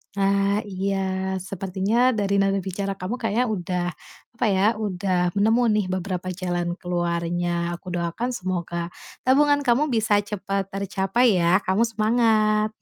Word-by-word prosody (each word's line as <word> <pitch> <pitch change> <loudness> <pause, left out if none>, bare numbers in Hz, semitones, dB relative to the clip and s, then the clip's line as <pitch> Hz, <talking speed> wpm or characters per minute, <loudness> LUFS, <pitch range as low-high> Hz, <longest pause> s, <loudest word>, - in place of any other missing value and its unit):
Nah, 200 +1 +2
iya 195 0 -2 0.4
sepertinya 195 +6 0
dari 200 -4 0
nada 195 0 +2
bicara 195 +1 -4
kamu 185 +6 -3
kayaknya 230 0 0
udah, 180 -4 -2 0.5
apa 235 - 0
ya, 190 0 +2
udah 185 -4 -1
nemu 220 +5 +2
nih 210 -2 +1
beberapa 185 0 -3
jalan 175 -1 -2
keluarnya. 175 0 -1
Aku 185 - -20
doakan 175 +8 -2
semoga 175 -3 -3 0.3
tabungan 285 +2 +4
kamu 265 +4 +3
bisa 220 -5 +2
cepat 195 -1 -3
tercapai 195 +2 +1
ya, 175 +3 +3
kamu 190 +5 +2
semangat. 215 -1 +2
195 Hz, 130 wpm, -24 LUFS, 180-215 Hz, 0.5 s, tabungan